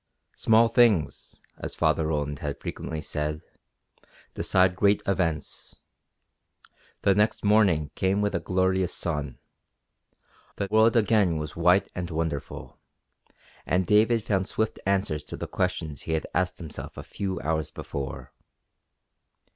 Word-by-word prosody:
Small 115 +1 +4
things, 115 -8 +2 0.2
as - - -6
Father 80 - +1
Roland 75 -2 -2
had 70 -1 -4
frequently 80 -1 -5
said, 75 0 -3 0.9
decide 90 -1 +2
great 100 +1 +3
events. 85 -5 -2 1.3
The 100 - +5
next 105 +2 +1
morning 100 -8 +3
came 95 +2 +1
with 105 -1 0
a 85 - 0
glorious 95 0 0
sun; 75 -6 -3 1.2
the 100 - -2
world 110 +2 +5
again 105 -6 +3
was 75 -1 -5
white 90 +3 +4
and 90 -1 -4
wonderful, 80 -3 -4 0.8
and 90 +1 +1
David 110 +4 +3
found 95 -2 0
swift 110 +1 -2
answers 95 -6 0
to - - -7
the - - -4
questions 85 -5 -2
he 80 - -3
had 80 - -1
asked 90 +1 0
himself 80 -4 -8
a - - -6
few 95 -3 -4
hours 80 0 -1
before. 70 -1 -6
90 Hz, 130 wpm, -26 LUFS, 80-100 Hz, 1.3 s, The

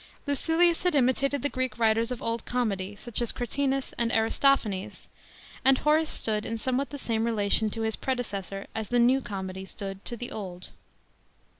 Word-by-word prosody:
Lucilius 325 +4 +2
had 360 -3 +2
imitated 275 +1 +2
the - - +3
Greek 255 -4 -2
writers 225 0 +3
of 250 - -4
Old 230 0 -1
Comedy, 205 -5 -1
such 235 +3 -1
as 240 - +1
Cratinus 270 +2 -1
and 235 -1 +1
Aristophanes; 225 -3 +1 0.6
«nd 265 0 +6
Horace 310 +2 +3
stood 215 -1 0
in 230 - -3
somewhat 260 +4 -1
the 285 - -6
same 225 -4 -1
relation 215 -1 +3
to 225 +2 -5
his 220 0 0
predecessor 200 -7 -3
as 220 -2 -4
the 245 - +2
New 250 +3 +4
Comedy 190 -3 -5
• - - -10
stood 195 -1 -7
to 240 - -2
the 245 +2 -6
Old. 185 -4 -6
235 Hz, 175 wpm, -28 LUFS, 210-265 Hz, 0.6 s, nd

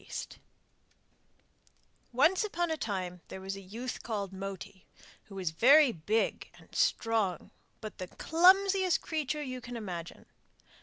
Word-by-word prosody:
'Moti' - - -8 1.7
Once 315 - +3
upon 345 -5 -1
a - - +1
time 185 - -4
there - - -8
was 195 +1 -5
a 195 - -9
youth 230 +7 -6
called 200 -4 -4
Moti, 195 0 -8 0.4
who 195 - -13
was 185 -4 -2
very 270 - +6
big 210 +5 -1
and - - -20
strong, 220 -6 0 0.3
but 215 -2 -8
the 185 - -5
clumsiest 375 - +4
creature 300 -1 -2
you 255 -2 -5
can 245 0 -7
imagine. 175 -6 -7
225 Hz, 135 wpm, -31 LUFS, 190-305 Hz, 1.7 s, very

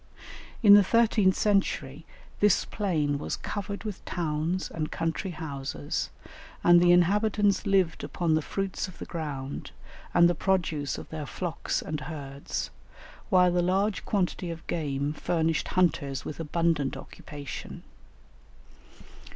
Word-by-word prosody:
In 205 -2 +9
the 205 0 +9
thirteenth 215 -3 +3
century 160 -8 0 0.3
this 205 -2 +4
plain 155 -8 -1
was - - -3
covered 200 0 -5
with 210 -3 -6
towns 165 +2 -2
and 155 -2 -3
country 165 +4 -2
houses, 140 - -4 0.5
and 175 0 +7
the 175 0 +6
inhabitants 200 +2 +3
lived 190 -4 +2
upon 170 -3 0
the 155 - +3
fruits 195 +3 -3
of 185 - -12
the - - -7
ground, 145 -5 -5 0.4
and 170 0 +6
the 175 - +2
produce 160 -6 0
of - - -8
their 155 -2 -5
flocks 175 +1 -3
and 155 -1 -3
herds, 140 -2 -5 0.6
while 180 -3 +5
the 175 0 +2
large 195 +3 +1
quantity 185 -3 -1
of 165 0 -7
game 145 -3 -2
furnished 160 +1 0
hunters 140 -7 0
with 150 - -6
abundant 165 -3 0
occupation. 145 -3 -8
170 Hz, 130 wpm, -28 LUFS, 150-190 Hz, 0.6 s, In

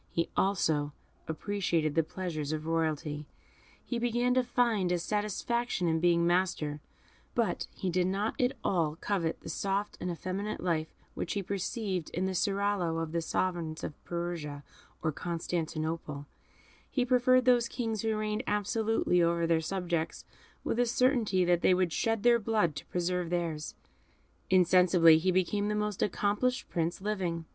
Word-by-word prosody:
He 165 -1 -1
also 155 -7 +1 0.3
appreciated 165 -2 -1
the 165 - +4
pleasures 155 -3 -4
of 155 0 -3
royalty, 155 -2 -1 0.6
he 240 - -2
began 240 +1 +1
to 255 - +4
find 235 -7 +1
a 180 - +2
satisfaction 210 +2 -1
in 160 0 +2
being 170 0 +3
master, 170 -4 +1 0.6
but - - 0
he 185 - -2
did 180 +1 +2
not 200 +4 0
at 250 +1 +2
all 160 -5 +1
covet 170 -2 -2
the - - -11
soft 200 +1 -2
and 180 - -2
effeminate 185 +4 -3
life 160 -3 0 0.3
which - - -3
he 200 -1 -2
perceived 195 -2 -2
in 180 +2 0
the 190 - -1
seraglios 195 -3 0
of 160 - -5
the 170 0 0
sovereigns 165 -2 -2
of - - -3
Persia 170 -4 -4 0.4
and 155 -3 0
Constantinople; 160 -3 -3 0.6
he 250 -3 0
preferred 255 0 +4
those 245 -2 +4
kings 225 -4 -2
who 220 -1 0
reigned 215 +1 -1
absolutely 210 -3 +1
over 170 0 +2
their 165 -1 +2
subjects, 170 -1 -2 0.4
with 235 - -1
a 245 - +3
certainty 230 -7 +2
that 175 -1 +3
they 185 - +5
would 180 -3 +1
shed 225 -2 0
their 240 -1 +5
blood 210 -8 +1
to - - -7
preserve 180 -1 -1
theirs. 165 -3 -2 0.7
Insensibly 180 -3 +6
he 185 +3 +1
became 185 +3 +1
the 210 - 0
most 210 -2 -2
accomplished 210 +6 0
Prince 170 +1 -1
living. 185 -5 -2
180 Hz, 155 wpm, -30 LUFS, 165-210 Hz, 0.7 s, Insensibly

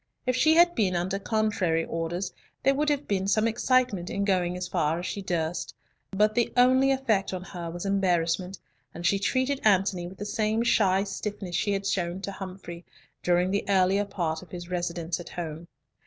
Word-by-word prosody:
If 255 -1 +1
she 315 +5 +4
had 345 +1 +6
been 195 - +1
under 185 +3 -1
contrary 205 -6 0
orders, 170 +3 -3 0.3
there 275 - +4
would 300 +2 +1
have 290 -1 -1
been 195 -1 0
some 215 +2 +3
excitement 230 -5 +1
in 200 0 -1
going 180 -2 +1
as 180 0 -4
far 160 -3 0
as 175 - -5
she 185 +3 -4
durst, 175 -3 -2 0.3
but 210 +2 +2
the 240 0 +1
only 260 +2 +5
effect 230 -9 +1
on 180 - -6
her 175 -3 -6
was 175 +3 -6
embarrassment, 185 -1 0 0.4
and 170 +1 -6
she 200 +2 +3
treated 260 +6 0
Antony 195 -3 +2
with 185 +2 -11
the 205 - -5
same 215 +2 0
shy 195 -5 +3
stiffness 200 -2 -5
she 205 - +1
had 195 0 -2
shown 180 -2 -1
to 200 - -4
Humfrey, 185 -3 -8 0.4
during 180 +1 +2
the 200 - 0
earlier 195 +1 +3
part 170 -5 -2
of 185 - -14
his 175 +1 -8
residence 175 -1 -2
at 175 - -8
home. 165 -1 -6
190 Hz, 190 wpm, -27 LUFS, 175-215 Hz, 0.4 s, had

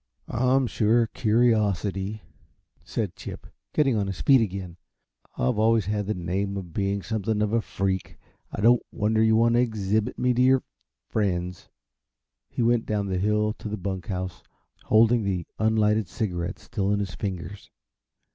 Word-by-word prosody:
"I'm 130 +2 +2
sure 115 0 +2
a - - -2
curiosity," 105 -4 +1 0.6
said - - -3
Chip, - - -8 0.3
getting 135 -5 +2
on 100 -2 0
his 95 -2 -5
feet 135 -3 +5
again. 95 -4 -4 0.6
"I've 65 +12 0
always 110 -1 +3
had 105 0 -2
the 110 - -1
name 95 +3 -2
of 90 -4 -7
being 100 +1 -1
something 110 -1 -1
of 105 0 0
a 115 - +3
freak 95 -3 -3 0.3
I - - -4
don't 120 +3 +5
wonder 110 0 +1
you 110 0 +4
want 115 +1 +4
to 120 - +4
exhibit 110 0 -1
me 125 0 +2
to 125 - +1
your 130 0 +4 0.5
friends." 90 -4 -2 0.8
He - - -2
went 120 0 +2
down 105 -2 0
the 95 -1 -1
hill 105 +2 +1
to 110 - -6
the 105 - -3
bunk 95 -1 -4
house, 95 -2 -4 0.4
holding 115 +1 +4
the 95 -3 -2
unlighted 110 -1 +2
cigarette 90 -3 -3
still 100 -3 -2
in 105 - +2
his 95 -3 -3
fingers. 95 -1 -6
105 Hz, 165 wpm, -26 LUFS, 95-115 Hz, 0.8 s, feet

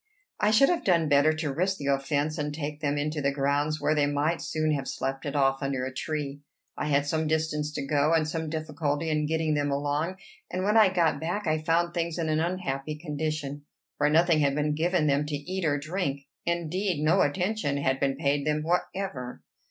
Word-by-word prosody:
I 210 - +3
should 225 +6 +5
have 345 -2 0
done 170 -5 +3
better 145 +1 +5
to 155 -3 -2
risk 185 +6 0
the 140 - -6
offence, 145 +3 0
and 150 0 -1
take 150 0 -5
them 145 -1 0
into 150 +1 -1
the 140 0 +2
grounds, 145 +2 0
where 155 - +2
they 145 -2 +2
might 145 +4 0
soon 155 0 -1
have 140 -3 -1
slept 135 +2 -3
it 140 - -4
off 135 -1 +2
under 135 -2 -1
a 130 - -5
tree. 145 0 -4 0.3
I - - -3
had 140 -1 +2
some 155 +2 0
distance 155 -1 0
to 140 - -3
go, 145 +2 +2
and 160 -2 +3
some 160 0 -3
difficulty 155 0 -2
in 150 -1 +1
getting 160 0 0
them 145 -1 0
along; 145 +5 -1 0.3
and 185 - -2
when 210 +2 +2
I 215 -3 +7
got 165 -6 +1
back 180 +6 -2
I 155 -1 +1
found 170 +2 +1
things 170 -1 -2
in 165 -2 -1
an 155 0 +2
unhappy 155 -4 -2
condition, 150 -2 -3 0.4
for 150 0 +3
nothing 165 +1 +4
had 140 -2 +2
been 150 0 +1
given 170 +1 +1
them 145 0 +2
to 150 - -2
eat 180 +6 -4
or 145 -2 +2
drink, 145 -2 -2 0.3
indeed, 170 0 -1
no 175 +5 +4
attention, 180 -1 0
had 135 -1 0
been 135 -1 +1
paid 140 0 0
them 150 0 0
whatever. 170 -6 -2
150 Hz, 210 wpm, -27 LUFS, 145-165 Hz, 0.4 s, I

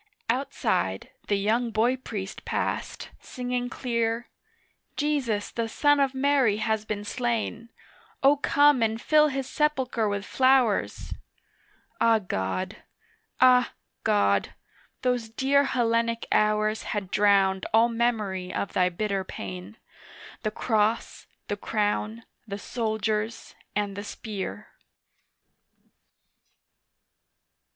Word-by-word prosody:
Outside 230 - -1 0.2
the 205 - +2
young 220 +4 +1
boy 230 +3 +2
priest 205 -6 -6
passed - - -3
singing 245 -1 -3
clear, 235 -1 -2 0.7
'Jesus 270 -9 0
the 230 -1 -2
son 290 +4 +3
of 275 -1 +1
Mary 265 -6 +3
has 220 -1 -1
been 210 -1 -3
slain, 235 -1 -2 0.5
O 275 +2 +7
come 290 -1 +4
and 225 0 +1
fill 305 +4 +4
His 270 -2 -3
sepulchre 260 -7 0
with 200 -1 -3
flowers.' 255 -4 +2 0.9
Ah, 230 -1 +5
God! 95 - -3 0.6
Ah, 250 -1 +5 0.3
God! 100 - +2 0.5
those 245 -3 0
dear 275 +4 +2
Hellenic 230 -2 0
hours 215 0 +2 0.2
Had 195 -3 -4
drowned 195 -2 +3
all 225 +2 +5
memory 215 -6 -1
of 200 - -3
Thy 180 -1 +3
bitter 195 +1 -2
pain, 95 - -8 0.6
The 215 - 0
Cross, 220 0 0 0.2
the 205 - -2
Crown, 215 +2 -1 0.2
the 200 -1 -4
Soldiers 220 0 -2 0.2
and 205 -1 -1
the 205 - -5
Spear. 210 0 -6
225 Hz, 105 wpm, -26 LUFS, 205-250 Hz, 0.9 s, O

